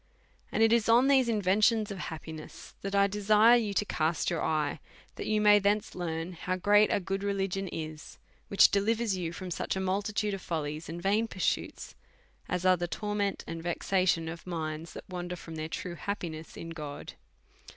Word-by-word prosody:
And 225 - +2
it 225 0 +5
is 230 -1 +2
on 240 +4 +6
these 265 -3 +4
inventions 210 +1 +2
of 195 - -6
happiness 160 -2 -8
that 195 0 -3
I 200 0 +5
de 205 +1 -3
sire 215 +3 +6
you 225 -4 +1
to 210 - +2
cast 160 -3 0
your 170 - -1
eye, 150 -1 0 0.3
that - - -6
you 215 0 +2
may 210 0 +6
thence 205 +1 0
learn 165 0 -4
how 185 +2 -3
great 205 +3 +4
a - - +2
good 195 +1 -3
religion 195 -1 -1
is, 155 -2 -7 0.3
which 200 - +6
delivers 215 +1 +1
you 175 -3 -3
from 180 +1 -7
such - - -2
a - - -2
multitude 205 +2 -1
of 195 - -4
follies 155 -1 -4
and 170 +1 -5
vain 210 +4 +2
pursuits 185 -4 -2 0.6
as 180 -1 -2
are 185 0 +5
the 175 0 -2
torment 205 +1 -2
and 165 0 -6
vexation 175 0 +1
of 165 +2 -7
minds 160 -1 -4
that - - -10
wander 180 -1 -5
from 165 -1 -10
their 155 0 -4
true 175 +2 -5
happiness 165 -3 -5
in 165 - -7
God. 150 -3 -7
185 Hz, 190 wpm, -30 LUFS, 165-205 Hz, 0.6 s, on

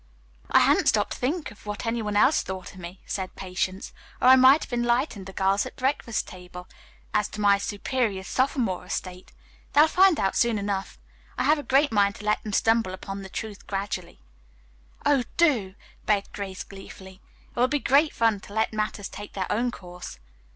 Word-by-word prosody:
"I - - +5
hadn't - - +3
stopped - - +2
to - - -4
think 300 +6 -2
of 210 - -16
what 210 +2 -4
any 230 0 -1
one 210 -1 -3
else 260 +8 +4
thought 190 -1 -7
of 185 - -13
me," 175 +2 -9
said 190 -2 -4
Patience, 185 +1 -4 0.3
"or - - +5
I 260 - +10
might 260 +3 +6
have - - -9
enlightened 240 -4 0
the - - -7
girls 195 +1 +1
at - - -12
the - - -13
breakfast 260 -4 -1
table 180 0 -11 0.5
as 210 -1 +2
to 215 - -9
my 200 -1 +4
superior 205 0 -2
sophomore 245 -4 0
estate. 180 0 -6 0.4
They'll 300 +2 +7
find 370 0 +4
out 195 - 0
soon 235 -2 +2
enough. 200 -1 -3 0.4
I - - 0
have 305 +1 +3
a - - -3
great 285 +1 +2
mind 200 -2 +2
to 210 - -10
let 210 0 +1
them 215 - -6
stumble 225 -3 +2
upon 195 +1 -7
the 195 - -9
truth 210 0 -7
gradually." 195 -3 -4 0.8
"Oh, 285 -3 +3
do," 240 - +2 0.3
begged 205 -2 +1
Grace 190 -2 -5
gleefully. 190 -1 -12 0.3
"It - - -4
will 250 - +5
be 290 +3 0
great 285 +2 +3
fun 225 -3 +1
to 200 - -13
let 220 +1 0
matters 215 -2 -2
take 205 0 -9
their 190 -2 -2
own 240 +3 +1
course." 180 - -9
210 Hz, 195 wpm, -26 LUFS, 190-245 Hz, 0.8 s, I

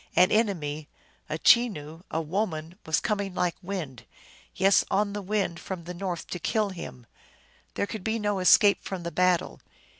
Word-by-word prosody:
An 180 - +5
enemy, 155 -9 0 0.4
a 155 - -2
Chenoo, 165 -8 +3
a 160 - -1
woman, 165 -1 -2
was 160 - +2
coming 200 -5 -2
like 180 -2 +1
wind, 175 - -5 0.5
yes 195 +1 +4
on 200 0 +1
the 205 - -3
wind 195 -3 -1
from 185 -3 -6
the 175 +2 -7
north 180 -1 -4
to 180 - -3
kill 215 +2 0
him. 165 -9 -8 0.7
There - - 0
could 210 -1 -7
be 220 +2 0
no 205 -2 -1
escape 200 +2 +5
from 185 -3 -5
the 170 - -4
battle. 180 -1 +1
185 Hz, 170 wpm, -27 LUFS, 165-205 Hz, 0.7 s, An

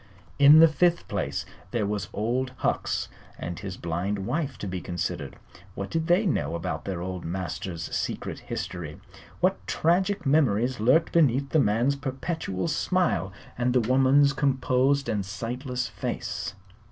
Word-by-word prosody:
In 145 +3 +9
the 165 - +9
fifth 175 +2 +2
place - - -2 0.2
there 115 -4 -1
was 100 -2 -2
Old 125 +4 -1
Hucks - - -1 0.3
and 85 0 -5
his 95 -2 -6
blind 95 +4 -2
wife 135 +1 -2
to 105 - -5
be 90 -1 -4
considered. 85 -2 -4 0.4
What 100 0 -5
did 160 0 -1
they 180 +5 +4
know 80 - 0
about 85 - -4
their 95 -3 -3
old 90 -1 -5
master's 85 -1 -4
secret - - -3
history? 80 -4 -5 0.4
What - - +2
tragic 185 +3 +1
memories 130 -4 +2
lurked 130 +9 +3
beneath 140 -4 +3
the 160 - +3
man's 120 +3 +2
perpetual 135 - -3
smile 175 - +1 0.3
and 125 0 +2
the 130 - +4
woman's 135 +4 +4
composed 135 0 +2
and 105 -2 0
sightless 120 +5 -4
face? 115 - -4
125 Hz, 145 wpm, -26 LUFS, 95-145 Hz, 0.4 s, In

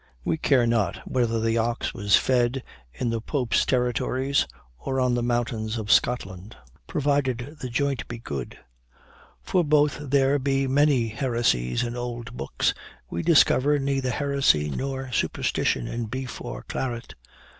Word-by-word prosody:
We - - +1
care 135 -6 +3
not 115 -6 +1
whether 115 -3 +1
the 115 +1 +1
ox 115 +1 -1
was 100 -1 +3
fed 125 0 +1 0.3
in 120 - -2
the 115 -1 -2
Pope's 125 -1 0
territories, 130 +2 +1 0.3
or 135 - -2
on 125 -1 +2
the 120 - +1
mountains 120 -2 -1
of 110 -2 -2
Scotland, 95 -4 +1 0.3
provided 140 -1 -1
the 130 - -4
joint 135 -2 -1
be 120 - -6
good; 70 - -6 0.9
for 180 -2 +2
though 150 -1 +4
there 140 0 +1
be 135 0 +1
many 135 -3 +3
heresies 110 - 0
in 120 0 -3
old 120 0 -5
books, - - 0 0.4
we 85 - -2
discover 145 - +4
neither 135 -2 -1
heresy 135 - +2
nor 135 - -4
superstition 65 - 0
in 120 0 -3
beef 130 +3 -5
or - - -6
claret. 120 -2 -4
125 Hz, 145 wpm, -25 LUFS, 115-135 Hz, 0.9 s, though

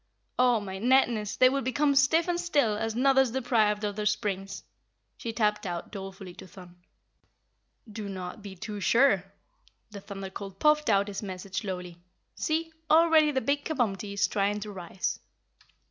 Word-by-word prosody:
"Oh, 250 -2 +4
my 190 -2 -6
netness, 235 -3 +2
they 255 - +7
will 275 +2 0
become 285 +3 +1
stiff 285 +5 +3
and 350 -1 0
still 290 -11 +1
as 225 +1 -3
Nuthers 265 +1 +4
deprived 220 -5 +1
of 205 -1 -2
their 210 0 -1
springs," 195 -2 -2 0.5
she 230 - -5
tapped 210 -2 0
out 175 -1 -5
dolefully 195 -2 -8
to - - -11
Thun. 180 -1 -14 1.1
"Do 210 -1 -7
not 185 +2 -7
be 200 -2 -9
too 205 +3 -6
sure." 230 -3 +3 0.7
The 200 -1 -8
Thunder 195 -1 -7
Colt 195 -1 -8
puffed 300 -2 +3
out 200 -1 +3
his 200 -1 -5
message 190 -1 -7
slowly. 180 -4 -6 0.3
"See, 325 +1 -2 0.2
already 320 -1 +5
the 265 -3 0
big 285 +1 0
Kabumpty 215 -10 -2
is 200 - +2
trying 205 +1 0
to 210 0 -6
rise." 185 -1 -4
210 Hz, 160 wpm, -28 LUFS, 195-265 Hz, 1.1 s, they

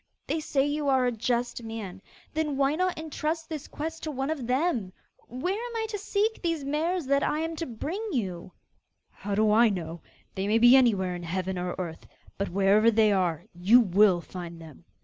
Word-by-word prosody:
They 320 - -1
say 280 -3 0
you 290 0 -1
are 260 -2 +3
a 245 - +2
just 240 +1 -1
man; 220 -5 -7 0.3
then 305 -3 -1
why 275 +1 +2
not 365 +3 0
entrust 315 +1 -3
this 310 -3 -6
quest 320 +2 -5
to 315 - -4
one 270 0 -2
of 275 -7 -4
them? 250 - 0 0.3
Where 260 +10 -2
am 470 +3 -5
I 445 -1 -1
to 415 -2 -4
seek 425 +2 -1
these 330 -4 -1
mares 315 +4 -1
that 280 +1 +2
I 305 +2 0
am 325 0 -3
to 330 - -3
bring 305 - -4
you?' 185 - -3 0.6
'How 200 +1 -4
do 215 0 +3
I 225 +2 +6
know? 170 -4 -5 0.3
They 190 +1 -2
may 215 +2 +3
be 240 +2 +7
anywhere 205 -8 +3
in 175 - -6
heaven 185 +2 -3
or 180 0 -3
earth; 170 -3 -6 0.3
but, 200 - -1
wherever 200 +4 +4
they 220 -1 +4
are, 180 -5 0
you 190 +8 +5
will 195 -4 +4
have - - -21
to - - -24
find 170 -2 -7
them. 160 0 -13
240 Hz, 205 wpm, -27 LUFS, 190-310 Hz, 0.6 s, be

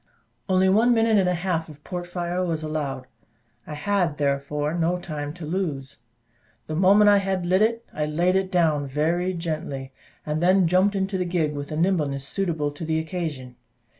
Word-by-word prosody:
Only 185 0 +4
one 225 +5 +4
minute 225 -2 +3
and 185 -2 +2
a 180 - +1
half 170 -2 -2
of 150 -1 -14
port 175 -1 -5
fire 175 0 -2
was 165 -3 -2
allowed. 145 -4 -3 0.6
I 150 - -6
had 175 -1 0
therefore 145 +1 -1
no 170 +1 +1
time 150 -5 -5
to 175 -3 -7
lose. 150 -6 -3 0.7
The 155 - -4
moment 195 +5 +5
I 205 0 +7
had 190 -2 -2
lit 185 +3 +2
it, 230 +1 +1
I 150 0 -2
laid 175 +5 +1
it 190 -1 0
down 155 -5 +2
very 165 +6 0
gently, 155 -5 -4 0.3
and 155 +1 -2
then 185 +1 +4
jumped 185 +4 +3
into 190 0 -1
the 180 - 0
gig, 170 -4 0
with 145 +1 -6
a 155 - -3
nimbleness 150 -6 0
suitable 165 -6 -1
to 145 +3 -9
the 160 0 0
occasion. 160 -7 -4
170 Hz, 185 wpm, -24 LUFS, 150-185 Hz, 0.7 s, I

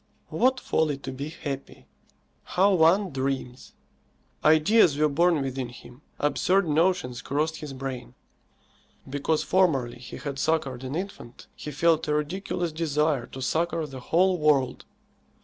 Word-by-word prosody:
What 255 0 +2
folly 155 - 0
to 135 -1 -7
be 140 +3 -5
happy! 140 -4 -7 0.6
How 195 +2 +2
one 180 +3 +4
dreams! 130 -2 -4 0.7
Ideas 160 +1 +5
were 155 0 +3
born 165 0 +2
within 130 -2 -3
him. 125 +2 -14 0.2
Absurd 180 +5 +2
notions 150 -6 +1
crossed 155 +5 -1
his 150 -2 -7
brain. 130 - -6 0.9
Because 145 +3 0
formerly 135 -11 +1
he 120 - -9
had 140 -2 -5
succoured 135 -6 -1
an 130 +2 -4
infant, 175 -10 -7
he - - -7
felt 160 +2 +2
a 150 - +1
ridiculous 175 +2 -2
desire 150 -4 0
to 130 - -7
succour 165 +2 0
the 135 -3 -8
whole 180 +7 +2
world. 145 -4 +2
150 Hz, 135 wpm, -26 LUFS, 135-170 Hz, 0.9 s, Ideas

